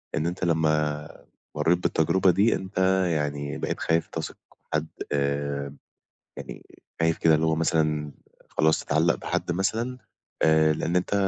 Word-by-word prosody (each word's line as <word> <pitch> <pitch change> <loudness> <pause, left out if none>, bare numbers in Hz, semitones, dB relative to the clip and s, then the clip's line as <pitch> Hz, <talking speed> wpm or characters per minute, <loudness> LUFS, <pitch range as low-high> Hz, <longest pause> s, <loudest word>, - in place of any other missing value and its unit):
إن 80 - 0
أنت 90 +2 -4
لمّا 75 -3 +1 0.5
مرَّيت 85 +2 +3
بالتجربة 90 +2 +2
دي، 100 +6 +3
أنت 95 +1 -7 0.4
يعني 70 -1 -2
بقيت - - -3
خايف 80 0 +1
تثق - - -5
في - - -30 0.2
حد، 75 +1 0 0.3
آآ، 70 0 -1 0.6
يعني، - - -9 0.4
خايف 80 -1 +2
كده 80 -1 +4
اللي 80 +1 +1
هو 80 - +2
مثلًا 75 -2 0 0.4
خلاص 80 0 +2
تتعلَّق 80 +3 +2
بحد - - -3
مثلًا. 110 +8 -1 0.5
آآ، 80 0 +5
لأن 85 +3 -2
أنت 90 +2 0
80 Hz, 145 wpm, -26 LUFS, 75-85 Hz, 0.6 s, آآ